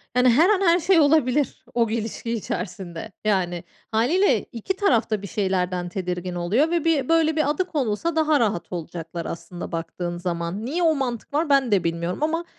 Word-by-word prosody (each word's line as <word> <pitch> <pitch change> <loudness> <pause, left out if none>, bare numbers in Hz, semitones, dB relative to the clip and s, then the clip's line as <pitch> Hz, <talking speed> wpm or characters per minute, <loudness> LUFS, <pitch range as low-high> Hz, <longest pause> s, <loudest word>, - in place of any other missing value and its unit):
Yani, 250 0 +5
her 305 - +5
an 410 -2 +3
her 345 -2 +4
şey 350 +1 +4
olabilir, 290 -2 +2
o 230 -2 +2
ilişki 230 +1 -3
içerisinde. 190 -3 -5
Yani, 180 -4 0 0.3
hâliyle 280 - +2
2 235 - -3
taraf 255 - +2
da 215 -2 -1
bir 200 - -6
şeylerden 185 -3 -1
tedirgin 180 -1 -4
oluyor 205 - +1
ve 340 -2 0
bir, 305 -5 +1
böyle, 320 -1 +3
bir 310 -2 +1
adı 305 +5 0
konulsa 300 +2 -1
daha 310 -2 +3
rahat 200 -7 -1
olacaklar 170 -1 -6
aslında 175 +1 -7
baktığın 170 +1 -4
zaman. 175 +4 -3
Niye 335 +7 -1
o 320 -2 +4
mantık 255 -2 -4
var? 305 +2 +1
Ben 275 -4 +3
de 195 -3 +3
bilmiyorum 170 +2 -2
ama 330 +2 0
230 Hz, 180 wpm, -23 LUFS, -, 0.3 s, Yani